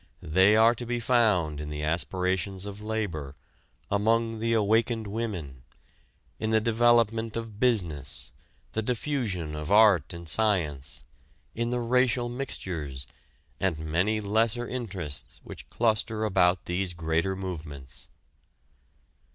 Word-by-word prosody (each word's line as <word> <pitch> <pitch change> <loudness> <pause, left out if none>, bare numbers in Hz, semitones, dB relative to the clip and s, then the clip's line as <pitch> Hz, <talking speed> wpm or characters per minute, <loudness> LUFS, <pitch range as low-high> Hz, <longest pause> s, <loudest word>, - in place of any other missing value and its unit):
They 95 +7 +4
are 115 +2 +6
to 120 +1 -7
be 120 0 -1
found 105 - +2
in 75 - -6
the 75 0 -4
aspirations 90 +4 -1
of 100 0 -7
labor, 100 -11 -3 0.6
among 115 +2 +1
the 115 +1 0
awakened 110 +1 +2
women, 100 - -4 0.8
in 110 - -1
the 110 0 +4
development 115 0 +2
of 115 -3 -6
business, 85 - 0 0.4
the 110 - -1
diffusion 110 - -2
of 75 +3 -5
art 100 -8 +5
and 85 -1 -8
science, 80 -8 0 0.5
in 120 +1 -2
the 125 0 -1
racial 125 0 +2
mixtures, 85 - -5 0.5
and 95 -5 0
many 85 +8 0
lesser 110 +3 +1
interests 95 - -5
which - - -11
cluster 110 -1 0
about 90 -3 +2
these 90 0 -2
greater 85 +3 0
movements. 80 -8 -7
100 Hz, 120 wpm, -27 LUFS, 85-115 Hz, 0.8 s, are